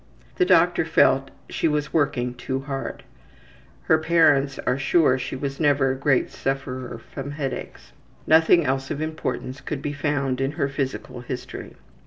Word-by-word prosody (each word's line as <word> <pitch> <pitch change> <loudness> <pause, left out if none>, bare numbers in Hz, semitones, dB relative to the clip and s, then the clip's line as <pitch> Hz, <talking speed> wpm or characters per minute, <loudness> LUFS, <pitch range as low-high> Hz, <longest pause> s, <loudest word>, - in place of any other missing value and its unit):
The - - +4
doctor - - +4
felt - - +3 0.2
she - - 0
was 150 -1 -1
working 125 -5 +1
too 130 +2 -4
hard. 135 -1 -5 0.8
Her 160 - +3
parents 150 -4 +3
are 125 +2 +1
sure 140 -2 +3
she - - -4
was 135 0 -4
never 145 -3 +3
a - - -2
great 135 -1 +1
sufferer 130 -2 -4 0.2
from 135 0 -5
headaches. 135 - -5 0.3
Nothing 160 +1 +5
else 135 0 -1
of - - -3
importance 145 -4 -4
could 145 -2 -5
be 145 - -2
found 140 -3 -1
in 135 +2 -1
her 140 - 0
physical 135 -2 -4
history. 125 +1 -7
135 Hz, 155 wpm, -24 LUFS, 130-145 Hz, 0.8 s, Nothing